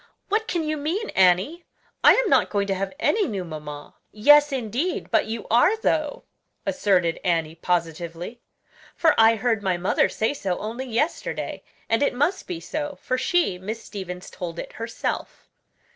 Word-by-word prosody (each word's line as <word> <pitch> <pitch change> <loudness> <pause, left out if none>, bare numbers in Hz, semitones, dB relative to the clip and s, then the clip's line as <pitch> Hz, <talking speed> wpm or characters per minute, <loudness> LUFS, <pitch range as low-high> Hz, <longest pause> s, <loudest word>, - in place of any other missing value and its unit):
"What 435 +2 +1
can 340 -2 -1
you 310 0 -1
mean, 340 +10 -2
Annie? 190 - +3 0.4
I - - +9
am - - +2
not - - +3
going 200 -1 0
to 195 - 0
have 195 0 -3
any 420 +5 +2
new 200 -7 -3
mamma." 150 -2 -8 0.2
"Yes, 295 +7 +6
indeed, 260 - -2
but - - +3
you 225 0 -4
are 245 - +5
though," 310 -8 -1 0.4
asserted 185 -10 +1
Annie 165 -3 0
positively; 170 +5 -3 0.5
"for 325 - +4
I 225 +1 +6
heard 225 -1 0
my 190 -3 0
mother 180 +2 +2
say 220 +5 0
so 190 -10 -2
only 230 +5 -5
yesterday; 250 +8 -2 0.3
and 225 - +1
it 280 - +2
must 305 +9 0
be 355 -3 -4
so, 295 -3 -4
for 255 - -1
she 265 - +1
Miss 220 +4 -5
Stevens 185 -3 -7
told 170 -2 -6
it - - -6
herself." 230 0 -4
225 Hz, 165 wpm, -24 LUFS, 180-295 Hz, 0.5 s, I